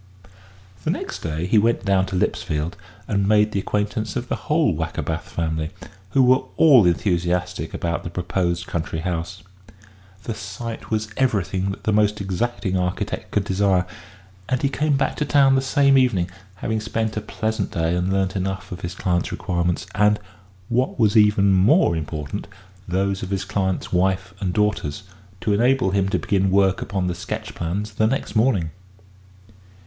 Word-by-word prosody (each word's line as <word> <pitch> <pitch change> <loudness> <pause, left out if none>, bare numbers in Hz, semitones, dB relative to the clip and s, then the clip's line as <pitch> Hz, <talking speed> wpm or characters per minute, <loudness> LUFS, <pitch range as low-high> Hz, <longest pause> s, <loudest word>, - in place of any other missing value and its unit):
The - - -2
next - - -3
day 80 +1 -3
he 105 +4 +4
went 115 -2 +1
down 95 -1 +2
to 95 - -4
Lipsfield 80 -2 -1 0.3
and 100 -2 +1
made 105 0 +4
the 100 - 0
acquaintance 105 +1 -2
of - - -3
the - - 0
whole - - +1
Wackerbath - - -3
family, 80 -1 -2 0.4
who 130 +7 +4
were 130 +2 +5 0.2
all 135 - +7
enthusiastic 90 -1 0
about 85 0 -2
the - - -5
proposed 90 0 -1
country 80 -1 -3
house. 90 +2 -4 0.8
The 115 - -3
site 110 +4 -7
was 110 -1 -1
everything 100 -7 0
that 95 - -6
the 110 - +1
most 105 0 +2
exacting 100 +1 -2
architect 90 -1 -2
could 105 - 0
desire, 95 -1 +2 0.6
and 130 0 0
he 140 - +3
came 145 0 +1
back - - 0
to - - 0
town 140 -2 +5
the 135 - +3
same 135 0 +4
evening, 95 -9 +1 0.2
having 110 +4 -2
spent 110 0 -2
a 110 - -2
pleasant 110 0 -2
day 80 +1 0
and 90 +2 0
learnt 95 0 0
enough 95 0 -3
of 90 - -6
his 85 0 -5
client's 90 -2 0
requirements, 85 0 -1
and 105 0 +3 0.5
what 125 +2 0
was 110 -2 +3
even 105 -2 +5
more 100 - +4
important 75 +3 -4 0.4
those 95 +2 0
of 95 - -5
his 95 -1 -2
client's 95 -2 -2
wife 95 +1 +1
and 95 -3 -1
daughters, 105 -5 0 0.4
to 105 - +1
enable 120 -1 +3
him 95 0 +1
to - - +1
begin 95 -1 +1
work 95 0 +3
upon 95 -2 -2
the 90 - 0
sketch 85 - -5
plans 95 +6 -3
the 110 +2 +2
next 135 +1 -2
morning. 110 -8 +2
95 Hz, 170 wpm, -22 LUFS, 90-110 Hz, 0.8 s, all